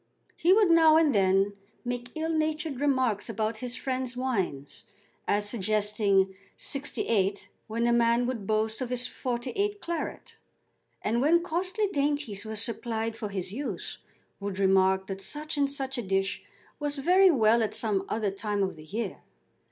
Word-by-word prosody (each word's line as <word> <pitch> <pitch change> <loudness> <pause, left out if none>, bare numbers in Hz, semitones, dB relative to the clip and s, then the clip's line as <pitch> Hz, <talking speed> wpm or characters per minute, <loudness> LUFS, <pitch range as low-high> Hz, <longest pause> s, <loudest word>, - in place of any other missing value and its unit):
He 345 - +3
would 400 -2 +5
now 320 -1 +7
and 315 -4 +4
then 195 0 +3 0.3
make 245 0 -3
ill 320 +1 -1
natured 310 -3 -1
remarks 260 -7 +1
about 220 0 -2
his 250 0 -3
friends' 255 -1 -3
wines, 190 - -2 0.4
as 205 0 +1
suggesting 205 -2 +1 0.2
'68 205 -8 -1 0.2
when 230 +1 -1
a 240 - +3
man 235 +1 +3
would 235 -6 -3
boast 220 +2 0
of 255 - -2
his 250 0 +2
'48 265 +15 -2
claret; 340 -3 -5 0.7
and 230 +3 +1
when 335 +5 +4
costly 370 +5 -1
dainties 285 - -1
were 220 0 -5
supplied 225 0 -2
for 215 -2 -5
his 190 -1 -4
use, 280 +5 -5 0.4
would 200 -2 -4
remark 190 0 +3
that 195 0 -6
such 300 +8 -4
and 280 -1 +1
such 270 -2 -3
a - - 0
dish 195 -1 -1 0.4
was 290 -1 -2
very 365 +7 +5
well 230 -6 +4
at 220 - 0
some 205 -4 +1
other 215 -3 0
time 205 0 -2
of 190 -4 -3
the 155 - -12
year. 220 +8 -4
235 Hz, 160 wpm, -28 LUFS, 205-285 Hz, 0.7 s, now